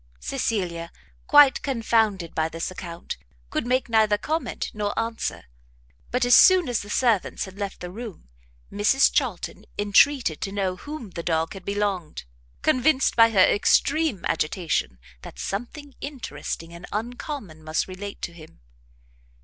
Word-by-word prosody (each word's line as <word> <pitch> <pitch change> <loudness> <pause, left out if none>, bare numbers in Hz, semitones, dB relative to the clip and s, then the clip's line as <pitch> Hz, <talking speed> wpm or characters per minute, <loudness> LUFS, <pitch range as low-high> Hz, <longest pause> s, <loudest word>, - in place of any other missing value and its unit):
Cecilia, 180 -10 -2 0.4
quite 290 -2 +7
confounded 225 - 0
by 160 0 0
this 165 +2 -4
account, 170 - -7 0.3
could - - -2
make 255 +1 +1
neither 220 -2 +3
comment 315 +8 -3
nor 205 -1 -3
answer; 225 0 -2 0.7
but, 250 0 +1
as 245 - +7
soon 370 -4 +7
as 245 -3 0
the 205 - -8
servants 225 -3 +1
had 190 +1 -12
left 200 -1 -5
the 180 - -6
room, 215 - -9 0.4
Mrs 210 +7 +3
Charlton 220 -6 -1
entreated 205 - +3
to 195 - -3
know 195 -2 -1
to 180 - -16
whom 290 -9 -7
the 170 - -5
dog 165 0 0
had 195 -2 -10
belonged, 200 -5 -2 0.4
convinced 265 +2 +3
by 230 -1 +7
her 195 -4 +5
extreme 280 - +2
agitation, 155 - -1 0.2
that - - -11
something 265 +8 -5
interesting 170 - -6
and 170 +1 -10
uncommon 220 - -5
must 155 0 -1
relate 195 +2 -8
to 170 - -4
him. 160 - -15
205 Hz, 145 wpm, -25 LUFS, 175-245 Hz, 0.7 s, quite